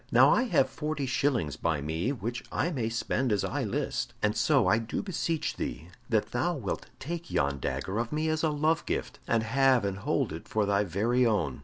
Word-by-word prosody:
Now - - +7
I 255 - +3
have 245 - +3
forty 150 -2 -3
shillings 125 - 0
by 80 -3 0
me 80 - -1
which 120 -2 -4
I 165 +7 0
may 120 -8 -1
spend 120 +2 -1
as 100 -2 +1
I - - -1
list, - - -2
and 105 0 +2
so 140 -8 +3
I 100 +5 +4
do 115 - -3
beseech 165 -4 -2
thee 80 +8 -4 0.2
that 110 -2 +1
thou 145 +9 0
wilt 110 -10 -4
take 170 +3 -5
yon 70 0 0
dagger 70 - -2
of 115 0 -2
me 155 +1 0
as 155 0 0
a 160 - +3
love 155 +2 +1
gift, - - -3
and 115 -1 +2
have 130 0 +3
and 100 0 -2
hold - - 0
it - - -8
for 110 -1 +1
thy 100 +1 +2
very 115 +7 +1
own." 80 - 0
115 Hz, 210 wpm, -29 LUFS, 100-145 Hz, 0.2 s, Now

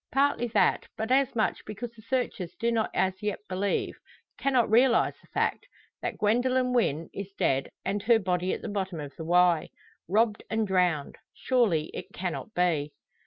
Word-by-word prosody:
Partly 270 -1 +2
that, - - +3
but 220 +3 -3
as 270 -1 +3
much 220 - 0
because 220 +3 -6
the 230 -2 -16
searchers 230 -7 -2
do 235 0 0
not 225 -2 +1
as 190 0 0
yet 210 -2 -1
believe 190 +2 -1 0.4
cannot 260 -4 +2
realise 240 +3 +4
the - - -23
fact - - -1 0.3
that - - -3
Gwendoline 250 +4 +2
Wynn 165 - 0
is 200 0 -6
dead, 135 0 +1 0.2
and 200 +2 -1
her 230 +2 +5
body 185 -2 0
at - - -4
the - - -4
bottom 190 -5 -3
of 145 -2 -7
the 160 - -7
Wye! 175 -1 +3 0.4
Robbed 215 +3 +2
and 220 0 0
drowned! 180 -6 +1 0.2
Surely 210 -12 +1
it - - -6
cannot 185 +4 -4
be? 160 -5 +1
205 Hz, 170 wpm, -28 LUFS, 180-235 Hz, 0.4 s, her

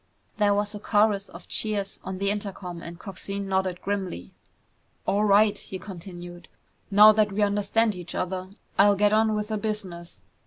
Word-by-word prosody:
There 205 -1 +3
was 205 +1 -1
a 210 - -6
chorus 205 -1 +2
of - - -12
cheers 210 -2 0
on 190 0 -5
the 200 +1 +1
intercom 195 -4 -5
and 170 0 -8
Coxine 195 +1 -6
nodded 190 -2 -1
grimly. 190 - -4 0.7
"All 205 +2 +1
right," 205 +1 +5
he 190 - -7
continued, 175 -2 -10 0.4
"now 210 +1 +8
that 215 -1 +2
we 205 +2 +1
understand 205 +2 +1
each 180 -2 -7
other, 185 0 -3 0.3
I'll 200 0 +6
get 205 +1 +3
on 220 0 +3
with 210 0 -3
the 215 -1 -1
business. 195 -6 -5
200 Hz, 165 wpm, -26 LUFS, 185-210 Hz, 0.7 s, now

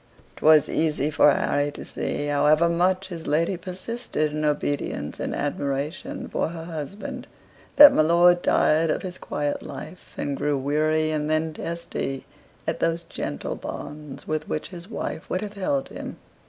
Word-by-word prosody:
'Twas 155 -1 +6
easy 155 -2 0
for 150 - +6
Harry 145 +1 +1
to 145 - -9
see, 145 - -3
however 150 +3 +4
much 185 +3 +1
his 165 -3 -7
lady 165 +5 +2
persisted 185 -2 -3
in 155 0 -2
obedience 145 - -1
and - - -2
admiration 145 +3 -3
for - - -1
her 165 0 -6
husband, 200 - -6 0.5
that 290 -1 +11
my - - +4
lord 175 +2 +5
tired 160 +1 +3
of - - 0
his 185 -1 -6
quiet 145 0 -2
life, 150 +5 -9
and 140 -1 -2
grew 145 -1 0
weary, 155 +3 +1
and 150 -1 -1
then 155 0 +1
testy, 165 -5 -4 0.4
at - - -2
those 165 0 0
gentle 75 - -4
bonds 150 -1 -8
with 155 0 -2
which 155 - -3
his 175 +1 -10
wife 235 - -5
would 185 - -1
have 210 -1 -5
held 270 +8 -1
him. - - -7
155 Hz, 160 wpm, -25 LUFS, 145-175 Hz, 0.5 s, that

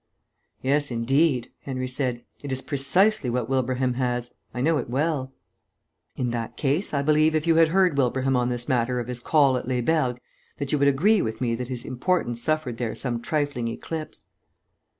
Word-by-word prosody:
"Yes, 145 +2 +1
indeed," 125 +2 +1
Henry 130 -2 -4
said. 125 -2 -2 0.2
"It 145 - -6
is 130 0 -2
precisely 150 - +3
what 120 -1 -1
Wilbraham 130 -1 0
has. 125 -1 -2 0.2
I 125 - -6
know 155 +4 +2
it 120 - -5
well." 135 0 -1 0.8
"In 125 -2 -1
that 115 -1 -4
case, 150 +7 0
I 140 -1 0
believe 155 +1 +3
if 155 0 0
you 165 -1 +3
had 165 -1 +6
heard 180 -1 +3
Wilbraham 130 +1 +1
on 125 0 +1
this 120 0 -3
matter 125 -2 +1
of 120 - -4
his 125 -1 -4
call 140 0 +3
at 125 - -6
Les 125 -1 0
Bergues 130 -3 +1 0.4
that 140 -1 -3
you 150 - +1
would 140 - +4
agree 185 +10 +4
with 110 0 -3
me 120 -2 0
that 125 +1 -3
his 125 -2 -5
importance 125 -3 -1
suffered 155 -6 -1
there 120 -3 -2
some 120 -3 -2
trifling 145 -4 -1
eclipse." 155 +7 -6
130 Hz, 190 wpm, -25 LUFS, 125-150 Hz, 0.8 s, had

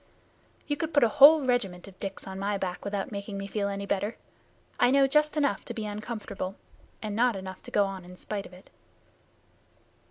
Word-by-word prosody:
"You 290 - -1
could 320 0 -3
put 285 - +6
a - - +6
whole 290 +4 +8
regiment 200 -8 0
of 190 -1 -14
Dicks 195 -1 -5
on 190 0 -6
my 200 +1 0
back 185 -2 -4
without 200 0 -3
making 200 0 -5
me 195 - -4
feel 200 0 -2
any 200 0 -3
better. 200 +3 -1 0.6
I 245 - +5
know 275 +1 +5
just 300 +3 +2
enough 285 -2 +1
to - - -6
be 220 -2 -3
uncomfortable, 210 -3 -5 0.5
and 210 -1 -3
not 240 0 +3
enough 190 -1 -7
to - - -9
go 205 - +3
on 195 -1 -6
in 180 +1 -12
spite 200 0 -5
of - - -18
it." 180 +1 -16
205 Hz, 200 wpm, -28 LUFS, 195-245 Hz, 0.6 s, whole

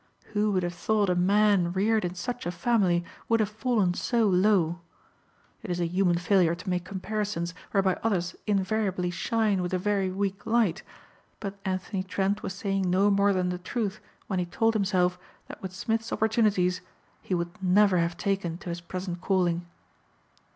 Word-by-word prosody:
Who 210 0 +2
would 185 -1 +1
have 175 0 -2
thought 205 +1 +1
a - - +1
man 195 -1 +3
reared 215 +3 +2
in 175 0 -3
such 245 +4 -4
a - - -1
family 180 -3 +1 0.2
would 230 0 +3
have 215 -1 0
fallen 215 -5 +1
so 230 +5 +1
low! 180 -3 +3 0.8
It 215 - -8
is 175 0 -1
a 175 - +1
human 175 0 +2
failure 175 -2 +3
to 180 +2 -7
make 180 -1 -1
comparisons 195 -2 -3 0.2
whereby 190 -2 +1
others 185 -5 0
invariably 195 -2 0
shine 215 0 0
with 180 +1 -1
a - - +2
very 195 0 0
weak 195 +1 -3
light, 220 -5 +2 0.6
but 200 -1 -6
Anthony 190 +1 -2
Trent 195 +2 -1
was 190 - -4
saying 195 -2 -1
no 195 +3 +3
more 200 0 +4
than 185 -2 +1
the 180 0 -3
truth 210 +2 -3 0.3
when 190 -3 -2
he 180 - -1
told 225 +6 +1
himself 185 -4 +1 0.3
that - - -10
with 190 - -5
Smith's 225 +4 -2
opportunities 210 -5 +2 0.4
he 185 - -2
would 175 +3 -4
never 190 0 +4
have 170 0 -1
taken 195 -4 -1
to 180 - -8
his 170 0 -4
present 180 0 -5
calling. 175 -3 +1
190 Hz, 175 wpm, -27 LUFS, 180-210 Hz, 0.8 s, more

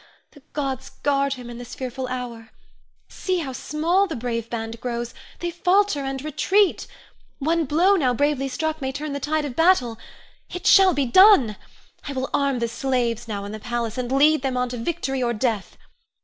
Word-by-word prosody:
The 290 - -17
gods 270 -3 -3
guard 280 -1 +2
him 250 -2 -10
in 240 0 -8
this 245 - -9
fearful 255 0 -4
hour! 245 -3 -6 0.6
See 370 -1 -2
how 285 -6 -4
small 335 +9 +1
the 325 - -4
brave 230 -1 -3
band 225 0 -5
grows; 240 -1 -3 0.3
they 345 0 -2
falter 365 0 +2
and 270 -1 -3
retreat. 380 +6 +1 0.5
One 325 +3 +1
blow 345 +8 +3
now 270 -9 +2
bravely 280 +1 +1
struck 315 +4 -3
may 265 0 -2
turn 290 +2 -5
the 280 - -3
tide 305 +2 -1
of 265 -4 -6
battle. 255 -10 +3 0.5
It 360 +2 -6
shall 385 -5 +6
be 280 -1 +1
done! 270 - +6 0.5
I 285 - -4
will 260 0 -3
arm 280 -2 +1
the 235 -1 -1
slaves 240 -1 -1
now 200 -2 -4
in 205 - -6
the 215 - -6
palace, 235 -1 -3
and 250 -1 -3
lead 295 +2 +4
them 260 -2 -1
on 250 0 0
to 245 - -5
victory 270 0 -2
or 240 -1 +1
death. 220 -3 -2
270 Hz, 190 wpm, -23 LUFS, 240-310 Hz, 0.6 s, shall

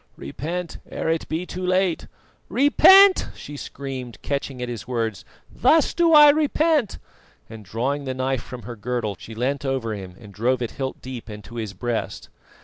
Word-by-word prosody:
repent, 165 - -5
ere - - -3
it 165 0 -1
be 160 +3 -2
too 185 0 -6
late!" 185 -1 +1 0.4
"Repent!" 380 +8 +6
she 145 - -9
screamed, 135 -4 -7
catching 140 -2 -3
at 125 - -3
his 115 -3 -6
words. 115 -6 -2 0.3
"Thus 320 -1 +3
do 340 -1 +3
I 295 -1 +9
repent!" 305 - +1 0.5
and 110 -1 -11
drawing 130 +8 -2
the 130 -1 -3
knife 130 -1 -1
from 125 -1 -10
her 120 +3 -7
girdle, 110 -1 -3
she 115 - -10
leant 130 +5 -1
over 130 -5 -2
him 95 -3 -8
and 105 -3 -13
drove 120 +5 0
it 115 - -4
hilt 130 -1 -5
deep 125 -3 -8
into 105 +2 -9
his 110 -4 -4
breast. 115 +3 -4
130 Hz, 170 wpm, -23 LUFS, 115-175 Hz, 0.5 s, I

